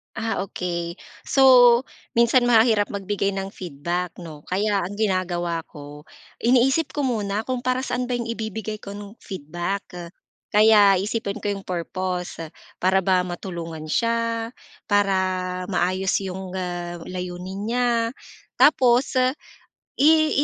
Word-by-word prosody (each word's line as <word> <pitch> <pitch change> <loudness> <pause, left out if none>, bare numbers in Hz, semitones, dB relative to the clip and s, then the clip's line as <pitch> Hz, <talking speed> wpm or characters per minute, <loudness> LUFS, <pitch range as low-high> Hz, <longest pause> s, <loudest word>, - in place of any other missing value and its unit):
Ah, 225 0 -2
okey. 170 -1 -4 0.3
So, 250 -2 +6 0.3
minsan 235 +1 +4
mahirap 225 -3 +4
magbigay 200 0 -2
ng 195 0 -4
feedback, 175 +1 -4
'no? 160 -4 -11
Kaya 200 +2 +1
ang 195 +2 -4
ginagawa 180 -5 -1
ko, 145 0 -12 0.3
iniisip 265 +4 +2
ko 290 - 0
muna 215 -4 -1
kung 255 0 -2
para 255 +1 -1
saan 250 -1 -2
ba 245 - -1
yung 240 - -2
ibibigay 220 -1 -5
ko, 200 0 -8
nung 205 +2 -10
feedback. 175 +3 -4 0.7
Kaya 210 -2 +7
iisipin 205 +2 -3
ko 205 - 0
yung 195 -1 -6
purpose. 180 -1 -4 0.3
Para 190 +1 +2
ba 185 -1 +2
matulungan 165 -4 -6
siya? 230 0 0 0.3
Para 185 -2 0
maayos 185 0 0
yung, 190 0 -6
ah, 175 -1 -4
layunin 180 +1 -6
niya? 245 +1 +1 0.6
Tapos 255 -2 +4 0.8
i 310 +1 +5
195 Hz, 125 wpm, -23 LUFS, 180-230 Hz, 0.8 s, Kaya